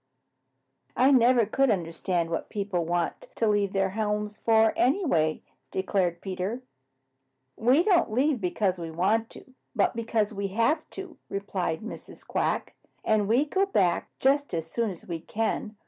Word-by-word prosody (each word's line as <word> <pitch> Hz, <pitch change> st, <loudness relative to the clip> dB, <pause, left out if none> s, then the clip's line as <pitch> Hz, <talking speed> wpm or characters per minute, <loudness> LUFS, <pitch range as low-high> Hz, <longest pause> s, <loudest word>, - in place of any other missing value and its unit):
"I 260 Hz, +3 st, +5 dB
never 245 Hz, -2 st, +5 dB
could 270 Hz, +5 st, +2 dB
understand 170 Hz, -2 st, -1 dB
what 165 Hz, -, -3 dB
people 200 Hz, -4 st, -2 dB
want 170 Hz, 0 st, -2 dB
to 225 Hz, -, +1 dB
leave 205 Hz, -2 st, +2 dB
their 195 Hz, -1 st, 0 dB
homes 210 Hz, 0 st, -2 dB
for, 220 Hz, -1 st, +3 dB
anyway," 250 Hz, -, +1 dB, 0.3 s
declared 185 Hz, -3 st, -1 dB
Peter. 195 Hz, +6 st, -4 dB, 0.9 s
"We 255 Hz, +8 st, +3 dB
don't 360 Hz, -, +3 dB
leave 260 Hz, +1 st, +1 dB
because 185 Hz, 0 st, 0 dB
we 165 Hz, -1 st, -5 dB
want 210 Hz, +8 st, +1 dB
to, 260 Hz, -, -14 dB, 0.2 s
but 205 Hz, -, +2 dB
because 225 Hz, -2 st, -1 dB
we 200 Hz, -1 st, -2 dB
HAVE 230 Hz, -, 0 dB
to," 385 Hz, -1 st, -8 dB
replied 195 Hz, -4 st, -3 dB
Mrs. 225 Hz, -, -10 dB
Quack, -, -, -1 dB, 0.3 s
"and 215 Hz, -2 st, +2 dB
we 245 Hz, +7 st, +3 dB
go 385 Hz, +6 st, +1 dB
back 185 Hz, -, +1 dB
just 280 Hz, -5 st, +1 dB
as 165 Hz, -1 st, -2 dB
soon 230 Hz, +7 st, -2 dB
as 180 Hz, -4 st, -9 dB
we 170 Hz, -2 st, -4 dB
can. 220 Hz, +4 st, -3 dB
210 Hz, 150 wpm, -27 LUFS, 185-240 Hz, 0.9 s, I